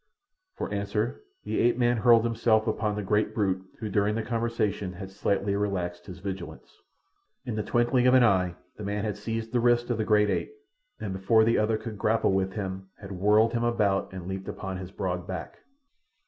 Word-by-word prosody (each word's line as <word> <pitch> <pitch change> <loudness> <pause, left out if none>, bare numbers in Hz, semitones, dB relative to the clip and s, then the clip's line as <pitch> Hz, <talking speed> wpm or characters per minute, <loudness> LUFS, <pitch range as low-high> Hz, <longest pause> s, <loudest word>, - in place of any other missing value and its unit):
For - - -4
answer 100 +3 -2 0.2
the - - -2
ape 120 +1 +3
man 120 -1 +2
hurled 115 0 +5
himself 115 -1 +2
upon 110 -1 -1
the 105 - -3
great 105 +2 +1
brute 95 -3 0
who 110 - -4
during 105 +1 +1
the 115 - -1
conversation 115 -5 -1
had 95 +1 -8
slightly 100 0 0
relaxed 95 -4 -2
his 90 - -8
vigilance. 95 -1 -8 0.6
In 125 - -3
the 105 - 0
twinkling 120 +3 +2
of 125 - +6
an 130 - +7
eye 90 -5 +3 0.2
the 105 - -7
man 100 +1 -2
had 105 - -2
seized 115 0 -4
the 125 - +3
wrist 120 +1 +2
of 115 - -1
the - - +2
great 105 -1 +3
ape, 430 - -2 0.4
and 95 - -4
before 100 +4 +3
the 115 +1 +3
other 110 +1 +2
could 110 -2 -7
grapple 110 -1 +2
with 95 0 0
him 95 -2 -5
had 100 -1 -10
whirled 105 +4 +3
him 120 0 0
about 105 -5 +1
and 95 -2 -7
leaped 95 0 -5
upon 95 -2 -5
his 95 -1 -7
broad 90 -2 -3
back. 95 -3 -6
105 Hz, 200 wpm, -27 LUFS, 95-115 Hz, 0.6 s, an